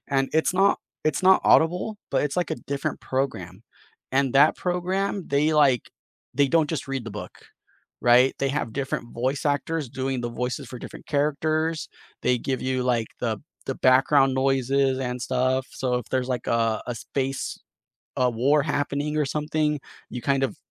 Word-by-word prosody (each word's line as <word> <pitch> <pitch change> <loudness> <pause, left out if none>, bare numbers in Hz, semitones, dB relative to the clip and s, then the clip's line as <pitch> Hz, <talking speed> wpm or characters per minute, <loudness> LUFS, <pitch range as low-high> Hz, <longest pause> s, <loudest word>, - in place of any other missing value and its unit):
And 135 0 +2
it's 160 +3 +2
not 195 +2 +4 0.3
it's 155 +4 0
not 190 0 +6
Audible, 180 +6 +3
but - - +2
it's, 145 +1 -2
like, 175 -4 0
a - - 0 0.2
different 140 -1 -2
program, 110 -8 -3 0.5
and 135 -1 +1
that 145 +3 +6
program, 185 +2 -1
they, 145 +3 +2
like, 140 -5 +3 0.5
they 140 -1 +4
don't 160 +1 +2
just 160 -3 -3
read 135 -3 -3
the 115 - -6
book. - - -8 0.7
Right, 125 +2 +5
they 140 - +1
have 140 -4 -2
different 130 -3 -3
voice 130 +4 -1
actors 145 0 -1
doing 130 0 -2
the 120 - -3
voices 125 +1 -2
for 125 - -8
different - - -10
characters. 155 +2 0 0.4
They 125 0 +3
give 130 +1 -2
you, 130 -1 -1
like, 120 -3 +1
the 115 -3 -1 0.3
the 135 - -1
background 135 +1 +4
noises 135 0 +2
and 125 -1 -3
stuff, 130 +1 0
so 125 -2 -1
if 125 - -3
there's, 130 -1 0
like, 125 -2 -2
uh, 115 -1 +1
a 120 - -2
space 135 +2 -3 0.6
a 125 -1 +3
war 135 +6 +2
happening 145 0 -1
or 150 - +2
something, 150 +1 -1 0.3
you 125 - -6
kind 135 +2 +1
of 135 - -2
135 Hz, 175 wpm, -25 LUFS, 125-150 Hz, 0.7 s, not